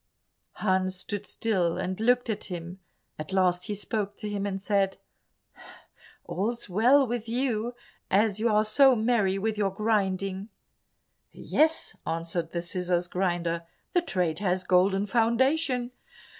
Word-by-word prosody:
Hans 185 Hz, -2 st, 0 dB
stood 205 Hz, +2 st, -5 dB
still 185 Hz, -7 st, 0 dB
and 185 Hz, +1 st, -3 dB
looked 245 Hz, +2 st, +2 dB
at 220 Hz, -3 st, -3 dB
him; 175 Hz, 0 st, -7 dB, 0.4 s
at 155 Hz, +4 st, -6 dB
last 180 Hz, -1 st, +2 dB
he 210 Hz, -, -3 dB
spoke 205 Hz, 0 st, -3 dB
to 210 Hz, -, -5 dB
him 205 Hz, -1 st, -2 dB
and 195 Hz, -1 st, -3 dB
said, 195 Hz, -1 st, 0 dB, 1.3 s
"All's 230 Hz, +5 st, -3 dB
well 245 Hz, +9 st, +4 dB
with 235 Hz, -2 st, -4 dB
you, 240 Hz, -1 st, -1 dB, 0.3 s
as 205 Hz, +1 st, +2 dB
you 230 Hz, +2 st, +2 dB
are 215 Hz, 0 st, +3 dB
so 265 Hz, +4 st, +5 dB
merry 215 Hz, -4 st, +1 dB
with 215 Hz, +1 st, -2 dB
your 200 Hz, -2 st, +2 dB
grinding." 195 Hz, -1 st, -1 dB, 0.8 s
"Yes," 315 Hz, +1 st, +1 dB
answered 165 Hz, 0 st, -3 dB
the 170 Hz, -1 st, -3 dB
scissors 180 Hz, 0 st, -1 dB
grinder, 175 Hz, -2 st, -1 dB, 0.3 s
"the 355 Hz, -, +4 dB
trade 180 Hz, -, -1 dB
has 185 Hz, -2 st, 0 dB
a -, -, -21 dB
golden 195 Hz, +2 st, +3 dB
foundation. 245 Hz, +4 st, +1 dB
200 Hz, 140 wpm, -27 LUFS, 185-225 Hz, 1.3 s, so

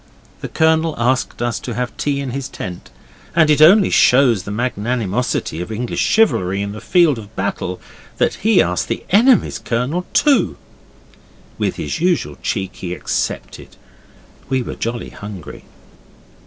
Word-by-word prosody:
The -, -, -5 dB
Colonel 160 Hz, 0 st, +2 dB
asked 125 Hz, +1 st, 0 dB
us 120 Hz, -2 st, -1 dB
to 120 Hz, -, -6 dB
have 125 Hz, 0 st, -3 dB
tea 140 Hz, -1 st, -1 dB
in 135 Hz, -2 st, -4 dB
his 135 Hz, +1 st, -4 dB
tent, 90 Hz, -9 st, -7 dB, 0.5 s
and 160 Hz, -2 st, +5 dB
it 150 Hz, -, +3 dB
only 190 Hz, +5 st, +7 dB
shows 125 Hz, -5 st, +4 dB
the 100 Hz, -, -9 dB
magnanimosity 115 Hz, -4 st, -2 dB
of 90 Hz, -, -6 dB
English 115 Hz, +2 st, -3 dB
chivalry 100 Hz, -, +2 dB
in 100 Hz, -, -4 dB
the 105 Hz, -, -8 dB
field 170 Hz, -8 st, +3 dB
of 110 Hz, 0 st, -13 dB
battle 95 Hz, -2 st, -3 dB, 0.4 s
that -, -, +2 dB
he 215 Hz, -3 st, +4 dB
asked -, -, -2 dB
the -, -, -3 dB
enemy's 230 Hz, +3 st, +4 dB
Colonel 130 Hz, +10 st, -2 dB
too. 290 Hz, -2 st, +3 dB, 1.0 s
With -, -, -1 dB
his -, -, -4 dB
usual 175 Hz, 0 st, 0 dB
cheek 95 Hz, -4 st, -3 dB
he 90 Hz, -1 st, -5 dB
accepted. -, -, -4 dB, 0.7 s
We 130 Hz, -2 st, 0 dB
were -, -, -6 dB
jolly 115 Hz, +1 st, -4 dB
hungry. 100 Hz, -5 st, -9 dB
125 Hz, 150 wpm, -18 LUFS, 105-160 Hz, 1.0 s, only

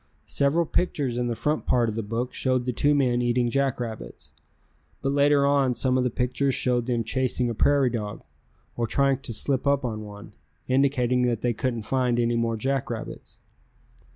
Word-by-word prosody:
Several 145 Hz, +4 st, +2 dB
pictures 145 Hz, -7 st, -1 dB
in 120 Hz, 0 st, -1 dB
the 120 Hz, -, -2 dB
front 150 Hz, +6 st, -2 dB
part 120 Hz, -2 st, +2 dB
of 110 Hz, -, -2 dB
the 115 Hz, -, -2 dB
book 115 Hz, +4 st, -3 dB
showed 130 Hz, -2 st, 0 dB
the 125 Hz, -, -1 dB
two 145 Hz, +5 st, +2 dB
men 125 Hz, -3 st, +2 dB
eating 120 Hz, 0 st, +1 dB
jackrabbits, 125 Hz, -4 st, -3 dB, 0.7 s
but 135 Hz, -, +1 dB
later 140 Hz, 0 st, +3 dB
on 140 Hz, -3 st, +2 dB
some 130 Hz, 0 st, 0 dB
of 130 Hz, -, +2 dB
the 125 Hz, -, +1 dB
pictures 130 Hz, +3 st, 0 dB
showed 125 Hz, -1 st, +1 dB
them 120 Hz, -2 st, 0 dB
chasing 125 Hz, +1 st, 0 dB
a -, -, -3 dB
prairie 135 Hz, +2 st, +2 dB
dog, 105 Hz, -3 st, -5 dB, 0.5 s
or 120 Hz, -1 st, -1 dB
trying 135 Hz, +1 st, +1 dB
to 135 Hz, -, -6 dB
slip 135 Hz, +5 st, -1 dB
up 140 Hz, -1 st, +2 dB
on 110 Hz, -3 st, -3 dB
one, 105 Hz, -1 st, -11 dB, 0.4 s
indicating 130 Hz, -2 st, +2 dB
that 115 Hz, -3 st, -1 dB
they 120 Hz, -1 st, 0 dB
couldn't 120 Hz, -1 st, -2 dB
find 125 Hz, 0 st, 0 dB
any 120 Hz, 0 st, +1 dB
more 115 Hz, -1 st, 0 dB
jackrabbits. 125 Hz, -1 st, -4 dB
125 Hz, 180 wpm, -25 LUFS, 120-135 Hz, 0.7 s, later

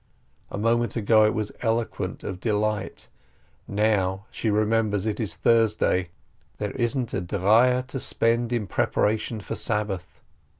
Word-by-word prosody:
A -, -, -5 dB
moment 115 Hz, +3 st, +1 dB
ago 110 Hz, -1 st, +4 dB
it 110 Hz, -, 0 dB
was 105 Hz, -2 st, -2 dB
eloquent 115 Hz, -5 st, -2 dB
of 95 Hz, -2 st, -5 dB
delight. 105 Hz, -1 st, -1 dB, 0.6 s
Now 100 Hz, -2 st, +1 dB
she 110 Hz, -, -2 dB
remembers 105 Hz, -1 st, +1 dB
it 105 Hz, -2 st, -2 dB
is 105 Hz, -8 st, -1 dB
Thurs 115 Hz, -2 st, +3 dB
day, 90 Hz, -4 st, +1 dB, 0.5 s
there 105 Hz, -1 st, -3 dB
isn't 120 Hz, -1 st, -1 dB
a -, -, -1 dB
dreier 110 Hz, +8 st, +3 dB
to 130 Hz, +1 st, -5 dB
spend 115 Hz, 0 st, +1 dB
in 120 Hz, -3 st, 0 dB
preparation 110 Hz, +4 st, 0 dB
for -, -, -6 dB
Sabbath. 105 Hz, -5 st, -2 dB
110 Hz, 140 wpm, -25 LUFS, 100-115 Hz, 0.6 s, ago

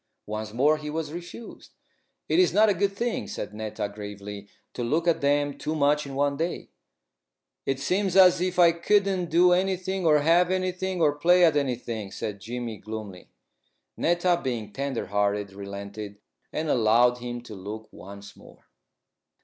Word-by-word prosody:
Once 110 Hz, 0 st, -5 dB
more 145 Hz, +7 st, +3 dB
he 150 Hz, 0 st, -6 dB
was 155 Hz, 0 st, -4 dB
refused. 175 Hz, +7 st, -10 dB, 0.5 s
"It -, -, +2 dB
is 370 Hz, -, +4 dB
not 215 Hz, +1 st, +6 dB
a -, -, +4 dB
good 195 Hz, +2 st, 0 dB
thing," 235 Hz, +3 st, -2 dB
said 105 Hz, -, -6 dB
Netta, 110 Hz, -1 st, -4 dB
gravely, 100 Hz, 0 st, -8 dB, 0.3 s
"to 120 Hz, -, -4 dB
look 160 Hz, +8 st, 0 dB
at 170 Hz, -, +2 dB
them 145 Hz, 0 st, +1 dB
too 155 Hz, -, -3 dB
much 145 Hz, 0 st, +2 dB
in 135 Hz, -, -7 dB
one 140 Hz, 0 st, +1 dB
day." 165 Hz, +3 st, -3 dB, 1.0 s
"It 135 Hz, -1 st, 0 dB
seems 185 Hz, +6 st, 0 dB
as 180 Hz, -2 st, +7 dB
if 180 Hz, 0 st, -1 dB
I 175 Hz, -2 st, +7 dB
couldn't 190 Hz, 0 st, +1 dB
do 175 Hz, +2 st, +5 dB
anything 185 Hz, 0 st, 0 dB
or 150 Hz, -1 st, +6 dB
have 170 Hz, +4 st, +4 dB
anything, 185 Hz, -1 st, -1 dB
or 145 Hz, -2 st, +4 dB
play 175 Hz, +4 st, +5 dB
at 160 Hz, -3 st, +3 dB
anything," 120 Hz, -7 st, -2 dB
said 100 Hz, -2 st, -5 dB
Jimmy, 115 Hz, 0 st, -5 dB
gloomily. 105 Hz, -3 st, -8 dB, 0.7 s
Netta, 175 Hz, +1 st, +1 dB
being 115 Hz, -5 st, -3 dB
tender 140 Hz, -2 st, -3 dB
hearted, 100 Hz, 0 st, -1 dB
relented, 100 Hz, +1 st, -7 dB, 0.3 s
and 155 Hz, +1 st, -3 dB
allowed 120 Hz, 0 st, +3 dB
him 120 Hz, 0 st, -5 dB
to 120 Hz, -2 st, -11 dB
look 105 Hz, +3 st, -7 dB
once 100 Hz, +1 st, -11 dB
more. -, -, -18 dB
145 Hz, 165 wpm, -26 LUFS, 110-175 Hz, 1.0 s, as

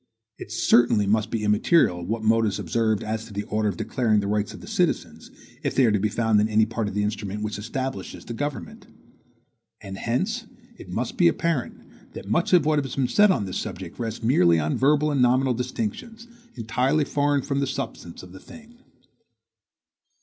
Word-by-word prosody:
It -, -, -9 dB
certainly 120 Hz, -4 st, +3 dB
must 105 Hz, +1 st, +1 dB
be 110 Hz, -1 st, -2 dB
immaterial 105 Hz, -, +3 dB
what 110 Hz, +4 st, -3 dB
mode 110 Hz, 0 st, +3 dB
is 100 Hz, -, -2 dB
observed 110 Hz, -3 st, 0 dB
as 110 Hz, +1 st, -3 dB
to 110 Hz, -, -12 dB
the 100 Hz, +1 st, -3 dB
order 105 Hz, 0 st, -1 dB
of 90 Hz, -, -5 dB
declaring 110 Hz, -4 st, +1 dB
the 100 Hz, -, -2 dB
rights 105 Hz, 0 st, -1 dB
of -, -, -10 dB
the -, -, -11 dB
citizens, -, -, -2 dB, 0.3 s
if -, -, -2 dB
they 135 Hz, -, +5 dB
are 115 Hz, -, +3 dB
to 105 Hz, -, +1 dB
be 105 Hz, +2 st, 0 dB
found 110 Hz, -1 st, +2 dB
in 105 Hz, -, +1 dB
any 110 Hz, 0 st, +3 dB
part 110 Hz, -1 st, -3 dB
of 100 Hz, -, -6 dB
the 105 Hz, -, +1 dB
instrument 105 Hz, -1 st, -3 dB
which 105 Hz, -1 st, -4 dB
establishes 130 Hz, +5 st, -5 dB
the 120 Hz, -, -6 dB
government. 145 Hz, +1 st, -5 dB, 0.9 s
And 95 Hz, 0 st, -8 dB
hence 205 Hz, -, -2 dB, 0.3 s
it -, -, -13 dB
must -, -, -3 dB
be -, -, +5 dB
apparent, 145 Hz, -, -3 dB
that -, -, -9 dB
much 170 Hz, -, 0 dB
of 175 Hz, -5 st, +5 dB
what 150 Hz, -2 st, +2 dB
has 135 Hz, -, -6 dB
been 135 Hz, -2 st, +1 dB
said 210 Hz, +7 st, +5 dB
on 145 Hz, -, +1 dB
this 95 Hz, -, -4 dB
subject 90 Hz, +2 st, -6 dB
rests 115 Hz, -1 st, -4 dB
merely 90 Hz, -8 st, +4 dB
on 75 Hz, 0 st, -1 dB
verbal 150 Hz, +2 st, +2 dB
and 140 Hz, -3 st, +1 dB
nominal 130 Hz, +1 st, +3 dB
distinctions, 225 Hz, -, -5 dB, 0.3 s
entirely 125 Hz, +6 st, 0 dB
foreign 145 Hz, -1 st, 0 dB
from 140 Hz, 0 st, -2 dB
the 140 Hz, -, 0 dB
substance 135 Hz, -11 st, -6 dB
of 90 Hz, -, -12 dB
the 95 Hz, -, -11 dB
thing. 240 Hz, 0 st, -15 dB
115 Hz, 200 wpm, -24 LUFS, 105-140 Hz, 0.9 s, they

